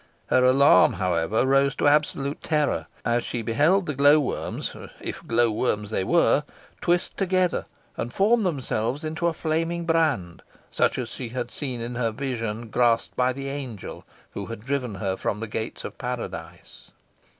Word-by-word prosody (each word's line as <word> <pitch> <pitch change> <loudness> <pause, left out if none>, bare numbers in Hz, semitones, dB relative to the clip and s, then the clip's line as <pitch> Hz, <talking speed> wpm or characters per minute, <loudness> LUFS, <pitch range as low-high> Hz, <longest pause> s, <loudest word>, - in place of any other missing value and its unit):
Her 130 - +4
alarm, 130 -6 +6
however, 90 +4 +1
rose 135 +1 +3
to - - +1
absolute 145 -1 +1
terror, 150 -2 0 0.2
as 120 0 +1
she 120 -2 -3
beheld 155 - +3
the 150 - -2
glow 145 +3 +6
worms 140 - -3 0.2
if - - -7
glow 115 0 +3
worms 105 -2 -1
they 95 - 0
were - - +3 0.4
twist 175 +1 +1
together 185 -2 +1 0.3
and 120 - -3
form 220 - +3
themselves 140 - -1
into 160 +2 -1
a 170 - +1
flaming 165 +2 -1
brand, 155 - +1 0.3
such - - +1
as 125 -3 -3
she 120 0 -6
had 125 0 -4
seen 130 -5 -4
in 120 +1 -4
her 120 -1 0
vision, 115 -2 -4
grasped 120 -1 +2
by 125 0 +2
the 135 +1 -5
angel 130 -7 -6 0.3
who - - -6
had 115 -2 -7
driven 130 -5 -2
her 95 0 -2
from 105 +2 -2
the 115 - -3
gates 110 +1 -5
of - - -6
Paradise. - - -7
130 Hz, 165 wpm, -25 LUFS, 115-150 Hz, 0.4 s, alarm